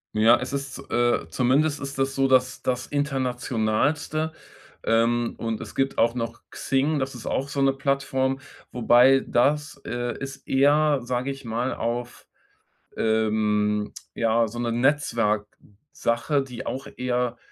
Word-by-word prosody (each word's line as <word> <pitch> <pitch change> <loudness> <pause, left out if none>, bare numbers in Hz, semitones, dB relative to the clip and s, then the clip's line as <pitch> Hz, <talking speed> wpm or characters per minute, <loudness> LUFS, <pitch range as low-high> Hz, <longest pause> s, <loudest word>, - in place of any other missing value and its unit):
Ja, 110 +2 +6
es 125 - -5
ist, 140 -1 -4
äh 120 -8 +1
zumindest 140 - +2
ist 140 0 -6
das 135 0 0
so, 135 0 +3
dass 125 -1 +2
das 125 -1 -1
Internationalste, 135 +2 -1 0.5
ähm, 115 +1 +1
und 115 -1 -3
es - - -8
gibt 135 0 -1
auch 115 +1 +3
noch 115 -1 -4
Xing. 140 +3 0
Das 130 0 -3
ist 120 - -9
auch 135 - -1
so 140 0 -2
'ne 135 0 +4
Plattform. 135 -1 0 0.3
Wobei 125 +2 +5
das, 145 +3 +1
äh, 120 0 -3
ist 135 0 -8
eher, 145 +1 +4
sage 125 +2 -2
ich 135 -1 -9
mal 120 +3 -1
auf, 120 +1 -4 0.7
ähm, 105 -1 +1 0.2
ja, 115 0 +2
so 120 +3 -7
'ne 120 -1 -1
Netzwerksache, 115 0 -1
die 125 -3 -8
auch 135 - -4
eher, 125 -1 -1
125 Hz, 140 wpm, -25 LUFS, 115-135 Hz, 0.7 s, Ja